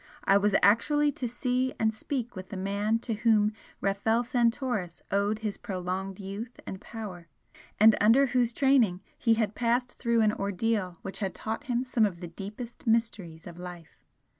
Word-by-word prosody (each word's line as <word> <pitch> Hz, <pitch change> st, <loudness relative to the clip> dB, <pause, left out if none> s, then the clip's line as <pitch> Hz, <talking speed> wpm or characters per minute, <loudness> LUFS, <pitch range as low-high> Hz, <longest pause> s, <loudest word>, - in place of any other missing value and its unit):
I 195 Hz, -, +4 dB
was 200 Hz, 0 st, +3 dB
actually 290 Hz, +9 st, +4 dB
to 255 Hz, -2 st, -4 dB
see 250 Hz, +2 st, -1 dB
and 220 Hz, 0 st, +1 dB
speak 245 Hz, +1 st, -4 dB
with 185 Hz, -1 st, -8 dB
the 200 Hz, -, -6 dB
man 200 Hz, +3 st, 0 dB
to 230 Hz, -, -1 dB
whom 215 Hz, -1 st, +3 dB, 0.3 s
Rafel 210 Hz, +4 st, +1 dB
Santoris 235 Hz, -6 st, 0 dB
owed 200 Hz, +2 st, +1 dB
his 210 Hz, -, -3 dB
prolonged 190 Hz, +1 st, -4 dB
youth 205 Hz, +5 st, -7 dB
and 190 Hz, -, -7 dB
power, 195 Hz, -7 st, -8 dB, 0.5 s
and 220 Hz, +1 st, +8 dB
under 230 Hz, +7 st, +6 dB
whose 245 Hz, -2 st, +1 dB
training 240 Hz, -8 st, +3 dB
he 230 Hz, -2 st, +2 dB
had 220 Hz, -2 st, 0 dB
passed 245 Hz, +2 st, 0 dB
through 235 Hz, -2 st, +1 dB
an 215 Hz, -1 st, +3 dB
ordeal 200 Hz, -2 st, -1 dB
which 195 Hz, 0 st, -6 dB
had 195 Hz, -3 st, -2 dB
taught 225 Hz, +6 st, -4 dB
him 245 Hz, -2 st, 0 dB
some 240 Hz, -4 st, +2 dB
of 175 Hz, -4 st, -8 dB
the 175 Hz, -, -6 dB
deepest 210 Hz, +8 st, -8 dB
mysteries 205 Hz, -8 st, 0 dB
of 175 Hz, -1 st, -10 dB
life! 175 Hz, -3 st, -10 dB
215 Hz, 170 wpm, -28 LUFS, 195-235 Hz, 0.5 s, and